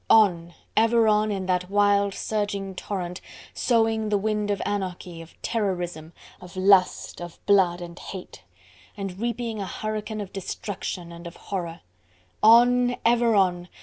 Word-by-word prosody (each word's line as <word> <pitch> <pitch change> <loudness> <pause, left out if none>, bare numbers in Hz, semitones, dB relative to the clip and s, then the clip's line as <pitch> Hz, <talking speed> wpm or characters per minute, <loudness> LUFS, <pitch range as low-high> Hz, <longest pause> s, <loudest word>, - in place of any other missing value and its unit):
On! 175 -6 +4 0.2
ever 230 0 +4
on! 215 0 +3
in 195 -2 -3
that 180 0 0
wild, 200 -1 +3
surging 200 -2 -2
torrent; 180 -2 -5 0.3
sowing 225 -2 +1
the 210 - +2
wind 210 0 -1
of 200 -1 0
anarchy, 180 -4 -4
of 165 - -15
terrorism, 175 -7 -2 0.3
of 180 0 -12
lust 185 -2 +3
of 175 -1 -8
blood 185 -3 +3
and 170 0 -8
hate, 190 -2 -9 0.6
and 195 -2 -5
reaping 235 -1 -3
a 195 - -4
hurricane 215 +1 -4
of 200 -2 -6
destruction 185 -2 -5
and 170 0 -9
of 170 - -10
horror. 170 -4 -5 0.6
On! 245 +2 +6
ever 235 -1 +4
on! 180 -2 +1
200 Hz, 145 wpm, -25 LUFS, 180-215 Hz, 0.6 s, On